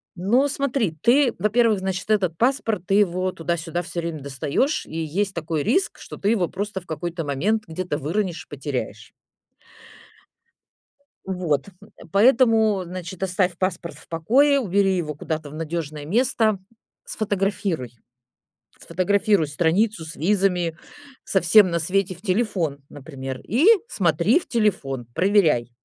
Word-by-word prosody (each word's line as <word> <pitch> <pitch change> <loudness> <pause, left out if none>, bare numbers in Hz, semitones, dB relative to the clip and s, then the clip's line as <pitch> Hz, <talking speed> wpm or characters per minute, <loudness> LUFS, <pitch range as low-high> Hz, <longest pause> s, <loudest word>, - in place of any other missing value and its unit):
Но 225 +10 +2
смотри, 270 - -1
ты, 255 0 +4
во-первых, 220 0 +2
значит, 190 +1 -4
этот 185 -6 +1
паспорт- 230 - 0
ты 195 - 0
его 185 -2 +2
туда-сюда 170 0 -3
всё 175 0 -5
время 165 -3 -5
достаешь, 140 - -1
и - - -10
есть 180 +5 -1
такой 160 -3 -2
риск, 375 - 0
что - - -9
ты 200 - 0
его 205 -6 +2
просто 195 0 -4
в - - -20
какой-то 170 0 -4
момент 190 +11 0
где-то 165 -2 -3
выронишь 175 +4 -2
и - - -56
потеряешь. 140 -2 -5 2.1
Вот, 180 -4 -1
м, 205 - -16
поэтому, 220 -2 +4
значит, 180 +1 -8
оставь 180 -2 0
паспорт 175 -4 -2
в 155 - -17
покое, 260 - +3
убери 195 -5 +1
его 155 -4 -3
куда-то 155 0 -5
в - - -11
надежное 155 -2 -4
место, 220 - +1 0.5
сфотографируй. 195 - -2 0.9
Фотографируй 200 -1 +1
страницу 170 +6 0
с 160 +1 -9
визами, 180 -2 +1 0.5
со 190 - +1
всем 185 +2 +6
на 170 - 0
свете 185 +3 0
в 180 - -19
телефон, 185 -8 -1
например, 135 -2 -7
и 240 - +1 0.2
смотри 175 - +2
в - - -15
телефон, 145 - -1
проверяй. 180 - +3
185 Hz, 135 wpm, -23 LUFS, 160-210 Hz, 2.1 s, всем